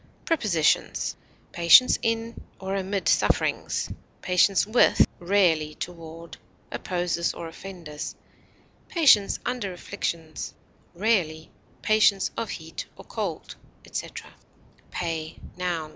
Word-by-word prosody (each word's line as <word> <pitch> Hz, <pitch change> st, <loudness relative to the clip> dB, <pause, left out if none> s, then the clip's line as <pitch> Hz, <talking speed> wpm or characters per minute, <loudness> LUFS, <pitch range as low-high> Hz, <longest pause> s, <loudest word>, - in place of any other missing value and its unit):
Prepositions: 210 Hz, -, +1 dB, 0.4 s
Patience 170 Hz, +9 st, +6 dB
in 230 Hz, 0 st, -2 dB, 0.2 s
or 190 Hz, +1 st, -3 dB
amid 195 Hz, 0 st, -2 dB
sufferings; -, -, +1 dB, 0.4 s
patience 185 Hz, +2 st, +4 dB
with 220 Hz, +4 st, +5 dB
(rarely 170 Hz, -5 st, +2 dB
toward) 165 Hz, -1 st, -8 dB, 0.3 s
opposers 175 Hz, -2 st, -1 dB
or 165 Hz, -, -6 dB
offenders; 165 Hz, -3 st, -8 dB, 0.7 s
patience 275 Hz, -, +5 dB
under 245 Hz, -6 st, -2 dB
afflictions; 170 Hz, -4 st, -5 dB, 0.4 s
(rarely) 170 Hz, -6 st, 0 dB, 0.3 s
patience 215 Hz, -3 st, +4 dB
of 230 Hz, -, -3 dB
heat 160 Hz, 0 st, -6 dB
or -, -, -13 dB
cold, -, -, -4 dB, 0.3 s
etc. -, -, -6 dB, 0.6 s
PAY, 165 Hz, -2 st, -4 dB, 0.2 s
_n. 170 Hz, -4 st, -2 dB
180 Hz, 95 wpm, -26 LUFS, 165-205 Hz, 0.7 s, Patience